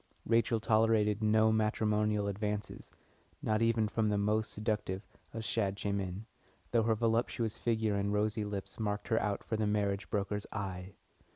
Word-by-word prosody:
Rachel 115 Hz, 0 st, +2 dB
tolerated 110 Hz, -1 st, +3 dB
no 110 Hz, +1 st, +4 dB
matrimonial 105 Hz, -1 st, +1 dB
advances, 105 Hz, +1 st, -3 dB, 0.5 s
not 110 Hz, +1 st, +1 dB
even 115 Hz, -1 st, +3 dB
from 110 Hz, 0 st, 0 dB
the 105 Hz, -, +1 dB
most 105 Hz, +2 st, +1 dB
seductive 105 Hz, -3 st, -2 dB, 0.3 s
of 115 Hz, -, -5 dB
Shadchanim, 100 Hz, -2 st, -2 dB, 0.5 s
though 115 Hz, -, +4 dB
her 110 Hz, 0 st, +2 dB
voluptuous 115 Hz, 0 st, 0 dB
figure 110 Hz, -2 st, +1 dB
and 100 Hz, 0 st, 0 dB
rosy 105 Hz, +1 st, 0 dB
lips 100 Hz, -1 st, -5 dB
marked 105 Hz, 0 st, -2 dB
her 115 Hz, -, +3 dB
out 100 Hz, -1 st, -1 dB
for 110 Hz, -, -2 dB
the 110 Hz, -1 st, +1 dB
marriage 100 Hz, -1 st, 0 dB
broker's 105 Hz, 0 st, -2 dB
eye. 95 Hz, -2 st, -5 dB
105 Hz, 150 wpm, -33 LUFS, 100-110 Hz, 0.5 s, no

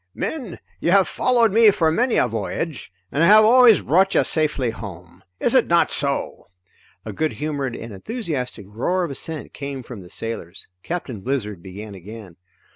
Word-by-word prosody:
"Men, 250 Hz, -, -4 dB, 0.2 s
you -, -, 0 dB
have 195 Hz, +1 st, +5 dB
followed 240 Hz, -3 st, +2 dB
me 225 Hz, 0 st, +7 dB
for 165 Hz, -5 st, +2 dB
many 240 Hz, +8 st, +1 dB
a -, -, +3 dB
voyage 115 Hz, -, -4 dB, 0.2 s
and 145 Hz, -, 0 dB
I 165 Hz, -, +5 dB
have 215 Hz, +2 st, +8 dB
always 240 Hz, -1 st, +6 dB
brought 190 Hz, +5 st, +3 dB
you -, -, +5 dB
safely 150 Hz, -6 st, 0 dB
home. 90 Hz, -4 st, -10 dB, 0.2 s
Is -, -, +1 dB
it -, -, +4 dB
not -, -, +3 dB
so?" -, -, -2 dB, 0.6 s
A 110 Hz, -, -6 dB
good 155 Hz, +8 st, -1 dB
humored 145 Hz, -4 st, -3 dB
and 115 Hz, -1 st, -8 dB
enthusiastic 135 Hz, -, -5 dB
roar 135 Hz, -, -1 dB
of 170 Hz, -, -3 dB
assent 155 Hz, +3 st, -6 dB
came 140 Hz, -2 st, -6 dB
from 115 Hz, -4 st, -9 dB
the 90 Hz, -, -13 dB
sailors. 100 Hz, -4 st, -5 dB
Captain 135 Hz, -, -5 dB
Blizzard 105 Hz, -7 st, -3 dB
began 100 Hz, +3 st, -9 dB
again. 100 Hz, -1 st, -11 dB
140 Hz, 175 wpm, -22 LUFS, -, 0.6 s, have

